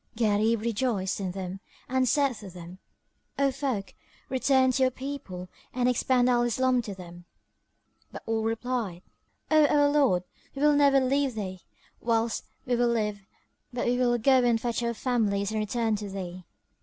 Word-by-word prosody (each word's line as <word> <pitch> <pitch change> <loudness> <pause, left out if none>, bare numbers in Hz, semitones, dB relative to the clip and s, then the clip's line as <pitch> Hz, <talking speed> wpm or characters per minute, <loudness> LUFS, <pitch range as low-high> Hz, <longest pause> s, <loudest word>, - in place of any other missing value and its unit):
Gharib 220 0 +2
rejoiced 220 -4 -1
in 190 -2 -2
them 185 0 -5 0.3
and 260 -1 +1
said 280 -3 +2
to 205 -3 -9
them, 175 +1 -11 0.6
"O 275 -1 +3
folk, 255 -8 -3 0.4
return 260 0 +3
to 265 - -1
your 260 - +5
people 255 -9 -7 0.3
and 250 -1 +2
expound 250 0 +2
Al 245 -1 +3
Islam 250 +1 +2
to 205 -4 -7
them;" 175 -1 -11 0.9
but - - -9
all 225 0 0
replied, 225 -5 -2 0.5
"O 310 -1 +6
our 290 0 +4
lord, 275 -12 +3 0.3
we 275 - -2
will 300 0 +6
never 280 -1 +5
leave 270 -1 +1
thee, 190 -3 -5 0.4
whilst 230 -1 0 0.2
we 245 - +1
live; 215 -5 0 0.4
but 245 -1 -2
we 245 - +2
will 240 -1 +3
go 260 +2 +4
and 235 -2 +3
fetch 235 0 -2
our 235 0 -1
families 215 -5 0
and 220 - -1
return 220 +1 0
to 205 -1 -6
thee." 185 -2 -7
235 Hz, 165 wpm, -27 LUFS, 200-260 Hz, 0.9 s, O